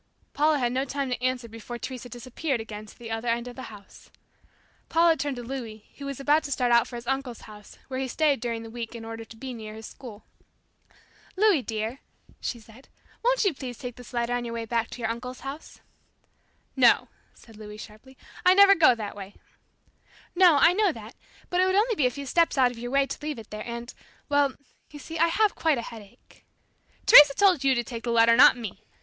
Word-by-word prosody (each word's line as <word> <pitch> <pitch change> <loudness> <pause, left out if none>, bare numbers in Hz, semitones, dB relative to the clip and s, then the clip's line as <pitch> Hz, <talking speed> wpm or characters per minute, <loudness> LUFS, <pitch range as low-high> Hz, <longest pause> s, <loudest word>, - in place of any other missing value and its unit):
Paula 305 +1 +2
had 245 -3 0
no 260 +2 0
time 275 -1 -3
to 250 0 -3
answer 255 -2 -1
before 230 +2 -8
Teresa 250 0 -7
disappeared 255 +3 -4
again 215 -1 -8
to - - -16
the 230 -2 -9
other 225 +2 -4
end 235 +1 -1
of 245 - -9
the 260 - -8
house. 205 -2 -15 0.8
Paula 330 0 +4
turned 285 -3 -3
to 245 - -7
Louis, 230 -4 -7
who 280 - -6
was 275 -1 -5
about 295 +3 +3
to 285 - -6
start 250 -2 +1
out 235 -1 +4
for 245 - -9
his 235 0 -7
uncle's 265 -2 -3
house, 210 -1 -14
where 260 -1 -4
he 265 - -2
stayed 290 0 +1
during 230 -1 -4
the 225 - -10
week 235 0 -6
in 225 -1 -8
order 225 0 -7
to 225 0 -14
be 260 +2 -7
near 215 -2 -8
his 220 0 -10
school. 220 -5 -11 1.1
"Louis 395 -6 +3
dear," 225 +2 -4 0.4
she 240 - -4
said, 225 +4 -18 0.3
"won't - - +2
you 390 - +2
please 255 -4 -7
take 245 -2 -7
this 250 - -13
letter 240 0 -1
on 245 0 -1
your 235 -1 -5
way 230 -1 -4
back 230 0 -1
to 245 - -9
your 220 - -1
uncle's 250 +2 -7
house?" 275 +3 -9 0.9
"No," - - +4 0.3
said 225 - -17
Louis 210 0 -10
sharply; 220 +5 -13 0.3
"I 365 +1 +6
never 400 0 +8
go 310 -9 +5
that 215 -3 -6
way." 200 0 -10 1.0
"No, 360 -3 +6
I 335 - +6
know 405 -1 +2
that; 225 -4 -11 0.4
but 360 +1 +2
it - - +4
would 375 - +1
only 445 +4 +3
be 295 -11 +2
a - - +1
few 280 +3 -8
steps 335 +3 +1
out 255 -2 +4
of 235 - -11
your 245 +1 -5
way 275 +1 +2
to - - -7
leave 300 -2 -4
it 225 -2 -12
there, 215 +1 -7
and 235 +1 -6 0.4
well 285 -2 +2 0.3
you 295 - -11
see 320 +3 -7
I 335 - +5
have 420 +5 +2
quite 320 -4 +1
a 235 - -4
headache." 225 +1 -13 0.6
"Teresa 290 -1 +9
told 375 -8 +3
you 270 -1 +3
to 240 - 0
take 230 -1 -7
the 240 - -3
letter, 230 0 +5
not 250 0 +7
me. 225 -5 -7
245 Hz, 225 wpm, -26 LUFS, 230-285 Hz, 1.1 s, Teresa